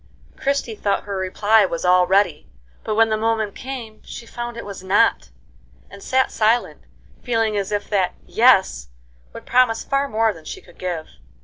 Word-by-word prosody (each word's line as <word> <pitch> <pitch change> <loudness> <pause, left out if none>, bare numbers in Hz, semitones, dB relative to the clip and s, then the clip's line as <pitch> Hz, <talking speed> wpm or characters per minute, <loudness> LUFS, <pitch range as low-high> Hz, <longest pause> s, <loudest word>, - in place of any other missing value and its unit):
Christie 275 -4 -1
thought 205 -2 -1
her 200 -1 -5
reply 205 +3 +2
was 170 -2 -2
all 180 0 +4
ready; 190 -5 +1 0.3
but 215 - -2
when 225 0 +4
the 215 - +1
moment 220 -2 -1
came, 250 -5 -8
she 235 - -9
found 240 0 -6
it - - -7
was 200 -2 -8
not, 195 - +2 0.6
and 200 - -12
sat 260 +4 +1
silent, 225 +2 +1 0.4
feeling 225 -3 0
as 200 0 -2
if 205 -1 -2
that 190 -3 +1
"Yes" 195 - +3 0.4
would - - -11
promise 245 -3 +2
far 275 0 -1
more 220 -1 +1
than 160 - -14
she - - -7
could 175 - -20
give. 175 -4 -3
215 Hz, 175 wpm, -21 LUFS, 190-230 Hz, 0.6 s, all